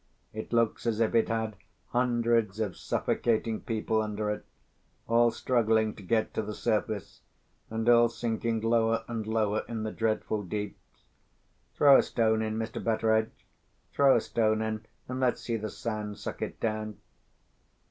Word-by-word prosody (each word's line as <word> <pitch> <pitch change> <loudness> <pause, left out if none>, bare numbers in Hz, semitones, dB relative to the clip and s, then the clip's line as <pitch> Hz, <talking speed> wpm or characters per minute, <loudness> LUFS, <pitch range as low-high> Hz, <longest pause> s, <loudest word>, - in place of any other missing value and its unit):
"It 110 0 -6
looks 115 0 +1
as 110 -1 0
if 115 0 +2
it 115 -1 +3
had 110 -2 -2 0.3
hundreds 120 -4 +1
of 105 -5 -1
suffocating 115 -1 0
people 110 -1 0
under 105 0 -2
it—all 115 +2 -2
struggling 110 -3 +1
to - - -12
get 110 +3 0
to - - -1
the 105 0 -5
surface, 105 -1 -2 0.5
and 110 +1 -3
all 120 -1 +6
sinking 115 -1 -2
lower 115 0 +2
and 115 -2 -4
lower 110 -1 +1
in 115 -2 -4
the 110 - -3
dreadful 110 -1 -1
deeps! 105 +2 -7 0.7
Throw 140 -2 +7
a - - +6
stone 110 -2 +1
in, 110 0 -2
Mr. 110 0 -4
Betteredge! 110 -1 0 0.5
Throw 140 -1 +5
a 115 - +3
stone 110 -1 +1
in, 110 0 -4 0.2
and 130 +1 -4
let's 125 -2 +1
see 115 - -2
the 110 -1 -3
sand 105 -3 -4
suck - - -6
it - - -4
down!" 110 -2 -2
110 Hz, 155 wpm, -29 LUFS, 110-115 Hz, 0.7 s, Throw